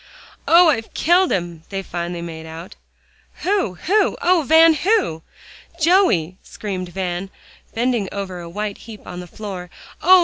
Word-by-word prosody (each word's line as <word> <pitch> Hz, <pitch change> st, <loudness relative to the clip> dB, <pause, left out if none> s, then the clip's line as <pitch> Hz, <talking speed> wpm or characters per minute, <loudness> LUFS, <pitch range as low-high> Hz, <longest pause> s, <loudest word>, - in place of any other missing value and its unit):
"Oh! 340 Hz, 0 st, +7 dB
I've 225 Hz, -7 st, -1 dB
killed 355 Hz, +3 st, +3 dB
him," 175 Hz, -3 st, -2 dB
they 195 Hz, -1 st, -4 dB
finally 175 Hz, -1 st, -4 dB
made 160 Hz, -1 st, -8 dB
out. 165 Hz, +3 st, -9 dB, 0.7 s
"Who 380 Hz, -, 0 dB
who? 405 Hz, -, +1 dB
Oh, 355 Hz, -1 st, +4 dB
Van! 320 Hz, +3 st, +6 dB
who?" 365 Hz, -, +1 dB, 0.6 s
"Joey," 310 Hz, -, +3 dB
screamed 185 Hz, -4 st, -6 dB
Van, 180 Hz, 0 st, -3 dB, 0.5 s
bending 235 Hz, -4 st, 0 dB
over 190 Hz, -3 st, -5 dB
a 170 Hz, -1 st, -8 dB
white 205 Hz, +3 st, -4 dB
heap 220 Hz, -3 st, -12 dB
on 180 Hz, -, -7 dB
the 180 Hz, -, -8 dB
floor. 185 Hz, -2 st, -7 dB, 0.3 s
"Oh! 370 Hz, +3 st, +7 dB
200 Hz, 145 wpm, -20 LUFS, -, 0.7 s, Oh